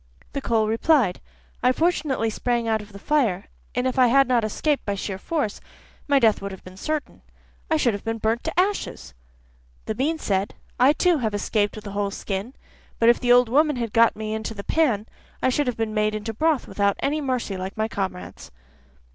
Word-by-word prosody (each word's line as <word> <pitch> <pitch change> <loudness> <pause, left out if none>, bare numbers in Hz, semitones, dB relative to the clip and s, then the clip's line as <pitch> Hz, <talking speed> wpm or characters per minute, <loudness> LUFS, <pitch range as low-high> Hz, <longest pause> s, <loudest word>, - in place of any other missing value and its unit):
The 280 - -2
coal 225 -4 +1
replied: 230 - +2 0.4
'I 250 +1 +4
fortunately 295 -8 0
sprang 235 +1 -1
out 220 -1 +1
of 210 0 -13
the 200 - -10
fire, 225 -6 +1 0.3
and 250 +1 0
if 260 0 0
I 250 - +7
had 275 +2 +5
not 245 -3 +2
escaped 285 +7 0
by 200 - -2
sheer 195 -1 -4
force, 290 - -2 0.5
my 285 -1 +4
death 225 -5 +3
would 200 0 -5
have 190 - -10
been 185 0 -12
certain, 305 +9 -4 0.5
I 315 - +3
should 245 -7 +2
have 200 - -5
been 225 0 -2
burnt 225 +2 0
to 320 +2 -1
ashes.' 365 - -1 0.7
The 220 - -2
bean 290 +8 0
said: 195 -8 -1 0.2
'I 260 +4 +6
too 350 +2 +3
have 220 -4 -1
escaped 205 0 0
with 215 - -9
a 200 - -6
whole 200 0 -1
skin, 200 +4 -5 0.4
but 230 - +4
if 240 - +4
the 245 -1 +1
old 245 0 +6
woman 295 +5 +3
had 235 -3 -3
got 230 0 +5
me 215 0 -4
into 220 0 -4
the 200 - -6
pan, 245 -10 +1 0.3
I - - +2
should 285 +2 0
have 250 - -1
been 225 -1 -2
made 215 0 +1
into 215 +1 -4
broth 310 +4 +1
without 200 -1 +1
any 300 +2 0
mercy, 255 -7 -2
like 190 +2 -6
my 215 0 0
comrades. 190 -4 -5
230 Hz, 210 wpm, -24 LUFS, 205-275 Hz, 0.7 s, I